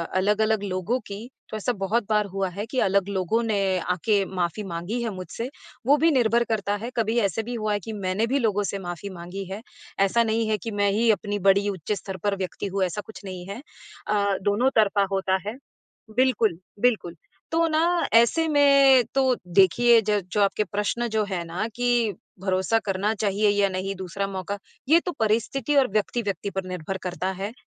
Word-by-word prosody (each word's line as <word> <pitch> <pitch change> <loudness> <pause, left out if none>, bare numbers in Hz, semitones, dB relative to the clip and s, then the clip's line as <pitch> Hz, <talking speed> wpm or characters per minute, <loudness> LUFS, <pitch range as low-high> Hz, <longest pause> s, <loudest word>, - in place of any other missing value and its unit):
अलग-अलग 210 +2 +2
लोगों 195 +6 -1
की 205 +5 -7 0.2
तो 215 - -4
ऐसा 245 +4 -1
बहुत 210 +4 +1
बार 210 -1 +2
हुआ 195 -1 -2
है 200 +4 -5
कि 255 +2 -2
अलग 195 0 +2
लोगों 195 +4 0
ने 220 -3 0 0.2
आके 195 +4 +1
माफ़ी 185 +2 -2
माँगी 185 +6 -4
है 235 - -1
मुझसे। 185 +7 -6 0.4
वो 290 +2 +6
भी 325 +2 +4
निर्भर 235 -3 +3
करता 205 -3 -1
है 240 - -3
कभी 225 +1 +1
ऐसे 200 +1 0
भी 240 +2 -5
हुआ 215 -2 -1
है 205 - 0
कि 220 +3 -7
मैंने 195 +2 -1
भी 270 +4 +1
लोगों 210 -4 +1
से 200 0 -3
माफी 175 +2 -6
माँगी 185 +2 -7
है, 205 +3 -5 0.4
ऐसा 195 +4 +3
नहीं 225 0 0
है 215 - +2
कि 225 +4 -6
मैं 205 0 +1
ही 225 +3 +2
अपनी 205 0 -2
बड़ी 195 +1 +3
उच्च 190 0 -5
स्तर 190 0 -6
पर 205 -1 +1
व्यक्ति 190 +1 -4
हूँ 195 0 -1
ऐसा 185 +3 -2
कुछ 220 - -11
नहीं 185 -2 -7
है। 215 +6 -6 0.5
अ, 200 -2 +1
दोनों 205 +7 +2
तरफा 205 -2 +4
होता 190 -1 +1
है। 230 +4 -4 0.6
बिल्कुल, 235 -9 +2 0.2
बिल्कुल 215 -9 +1 0.4
तो 330 0 +3
ना 310 0 +1 0.3
ऐसे 235 +8 +5
में 275 -3 +6
तो 265 -2 +3 0.2
देखिए 230 +5 +6
ज 210 -1 +2
जो 210 - +1
आपके 200 +2 +2
प्रश्न 210 +4 -1
जो 215 -1 0
हैं 185 -4 -3
ना 180 +6 -3
कि 240 -3 +1 0.3
भरोसा 190 +3 +1
करना 195 +3 0
चाहिए 205 0 +1
या 205 -1 +2
नहीं 190 +1 -3
दूसरा 190 +2 -3
मौका 195 +1 -4 0.3
ये 325 +3 +6
तो 355 - -1
परिस्थिति 230 +6 +1
और 270 -2 +5
व्यक्ति-व्यक्ति 205 -2 -1
पर 190 -1 -3
निर्भर 180 +1 -4
करता 180 +1 -3
है 195 +3 -5
205 Hz, 195 wpm, -25 LUFS, 190-230 Hz, 0.6 s, वो